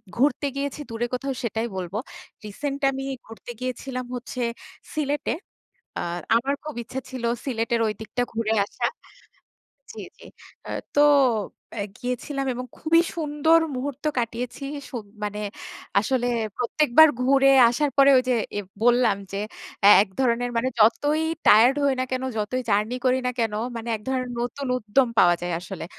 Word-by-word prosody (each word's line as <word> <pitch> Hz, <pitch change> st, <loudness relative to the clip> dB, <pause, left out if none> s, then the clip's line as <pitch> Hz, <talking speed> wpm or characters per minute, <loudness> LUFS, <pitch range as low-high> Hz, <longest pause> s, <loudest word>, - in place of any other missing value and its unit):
ঘুরতে 275 Hz, +2 st, +2 dB
গিয়েছি 280 Hz, +1 st, -3 dB
দূরে 230 Hz, +1 st, -2 dB
কোথাও 270 Hz, +2 st, -2 dB
সেটাই 225 Hz, +1 st, -1 dB
বলবো। 185 Hz, +1 st, -4 dB, 0.5 s
রিসেন্ট 280 Hz, +7 st, -4 dB
আমি 270 Hz, 0 st, -5 dB, 0.2 s
ঘুরতে 225 Hz, +2 st, -12 dB
গিয়েছিলাম 255 Hz, 0 st, -4 dB
হচ্ছে 245 Hz, +1 st, -6 dB, 0.5 s
সিলেটে। 295 Hz, -1 st, -1 dB, 0.7 s
আ -, -, -1 dB, 0.4 s
আমার 270 Hz, +5 st, +1 dB
খুব 305 Hz, -1 st, -6 dB
ইচ্ছে 255 Hz, +3 st, -7 dB
ছিল 255 Hz, -2 st, -6 dB, 0.2 s
সিলেটের 230 Hz, -2 st, -1 dB
ঐদিকটা 220 Hz, +2 st, -3 dB
ঘুরে 225 Hz, -1 st, -1 dB
আসা। -, -, -2 dB, 1.1 s
জি, -, -, -10 dB, 0.2 s
জি। -, -, -14 dB, 0.4 s
অ্যা -, -, -6 dB, 0.2 s
তো 290 Hz, -, +4 dB, 0.7 s
অ্যা 205 Hz, -, -3 dB
গিয়েছিলাম 265 Hz, +2 st, -3 dB
এবং 250 Hz, +1 st, -5 dB
খুবই 330 Hz, +1 st, +4 dB
সুন্দর 315 Hz, +1 st, +3 dB, 0.2 s
মুহূর্ত 270 Hz, +1 st, -5 dB
কাটিয়েছি। 240 Hz, +2 st, -3 dB, 0.3 s
সুব 240 Hz, -4 st, -5 dB, 0.2 s
মানে 210 Hz, 0 st, -3 dB, 0.6 s
আসলে 245 Hz, +3 st, 0 dB, 0.3 s
প্রত্যেকবার 300 Hz, +4 st, +5 dB
ঘুরে 275 Hz, +1 st, +4 dB, 0.2 s
আসার 285 Hz, +5 st, 0 dB
পরে 275 Hz, 0 st, +7 dB
ওই 255 Hz, -, +3 dB
যে -, -, +4 dB, 0.3 s
এব 200 Hz, -, -6 dB, 0.2 s
বললাম 240 Hz, -3 st, +4 dB, 0.2 s
যে 195 Hz, -, -3 dB, 0.5 s
এ -, -, +9 dB
এক 205 Hz, -, -1 dB
ধরনের 245 Hz, -1 st, +1 dB
মানে 255 Hz, +3 st, +1 dB
যতই 290 Hz, +8 st, +3 dB, 0.2 s
টায়ার্ড 235 Hz, +5 st, +7 dB
হই 280 Hz, -1 st, +3 dB
না -, -, +2 dB
কেন, 255 Hz, 0 st, -1 dB
যতই 215 Hz, +5 st, -1 dB
জার্নি 210 Hz, +4 st, +1 dB
করি 255 Hz, 0 st, +3 dB
না 250 Hz, -, +1 dB
কেন 225 Hz, -2 st, 0 dB, 0.2 s
মানে 230 Hz, 0 st, -6 dB
এক 210 Hz, -, -8 dB
ধরন 255 Hz, -1 st, -1 dB
নতুন 245 Hz, +3 st, -3 dB
উদ্যম 250 Hz, +3 st, +2 dB
পাওয়া 175 Hz, 0 st, +6 dB
যায় 175 Hz, 0 st, -2 dB
আসলে 185 Hz, -1 st, -7 dB
250 Hz, 150 wpm, -24 LUFS, 225-275 Hz, 1.1 s, এ